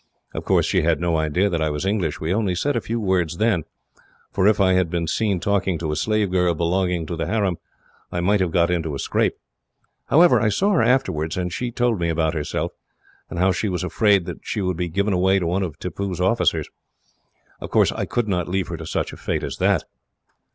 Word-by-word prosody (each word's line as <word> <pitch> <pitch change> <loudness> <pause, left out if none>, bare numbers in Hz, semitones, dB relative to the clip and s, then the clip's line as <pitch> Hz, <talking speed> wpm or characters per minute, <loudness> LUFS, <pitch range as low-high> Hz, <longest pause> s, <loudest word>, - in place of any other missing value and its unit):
Of - - -5
course, - - +3
she - - +1
had 80 0 +1
no 85 -1 0
idea 80 +5 +1
that 85 -5 -1
I 80 - +1
was 75 +4 -3
English. 95 -6 -1
We 80 +3 -1
only 100 -3 0
said 145 +10 0
a 120 - 0
few 115 +2 -3
words 90 -5 0
then, 105 -7 +1 0.7
for 95 0 +2
if 110 - +3
I 95 -1 +4
had 90 -2 +2
been 85 0 -1
seen 100 +3 0
talking 95 -1 0
to 80 -1 -3
a - - -1
slave 105 +1 0
girl 90 -2 +2
belonging 90 +1 0
to 85 - -4
the 80 - -3
harem, 100 -6 0 0.5
I 90 - -2
might 100 +4 +2
have 90 -2 +1
got 85 +1 +2
into 80 -4 -1
a - - -3
scrape. - - 0 0.7
However, 170 +3 +5
I 110 - +3
saw 195 - +1
her 190 - +3
afterwards, 100 - +1
and 90 -1 -2
she 125 +6 -2
told 120 -3 0
me 85 -1 0
about 80 -1 0
herself, 75 -2 -2 0.6
and - - -6
how 95 +2 +3
she 105 +3 -1
was 90 -1 -2
afraid 100 0 +2
that - - -6
she - - -4
would 90 -2 -1
be 90 +1 -2
given 100 +4 0
away 95 +2 +3
to 90 - -1
one 90 +4 0
of 90 -5 -4
Tippoo's 90 +1 -4
officers. 95 +6 +1 0.9
Of - - -7
course, - - +3
I - - -3
could 120 -2 -1
not 90 -4 -1
leave 95 -1 -1
her - - -4
to - - -8
such - - -2
a - - -9
fate - - -2
as - - -4
that. - - +2
90 Hz, 230 wpm, -22 LUFS, 85-100 Hz, 0.9 s, However